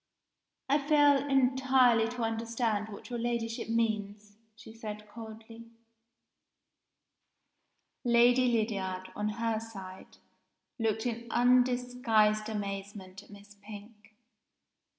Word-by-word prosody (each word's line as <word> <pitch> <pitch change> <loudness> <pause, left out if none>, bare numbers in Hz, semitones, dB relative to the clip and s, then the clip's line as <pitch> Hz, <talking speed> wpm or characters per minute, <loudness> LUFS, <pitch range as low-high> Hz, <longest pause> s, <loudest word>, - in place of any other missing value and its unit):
"I 285 +2 +3
fail 290 -1 +4
entirely 260 -3 +3
to 245 0 -4
understand 225 -1 -2
what 210 +4 -11
your 240 - -3
Ladyship 230 -1 -3
means," 210 -2 -2 0.2
she 220 - -13
said 210 -2 -8
coldly. 225 +1 -11 2.3
Lady 245 +1 +4
Lydiard, 195 -5 -2
on 210 0 -2
her 225 0 -1
side, 195 -4 -11 0.6
looked 220 0 -1
in 235 -1 -4
undisguised 245 -3 +2
amazement 200 -2 -6
at - - -21
Miss 205 0 -15
Pink. 210 +1 -13
225 Hz, 95 wpm, -30 LUFS, 210-240 Hz, 2.3 s, fail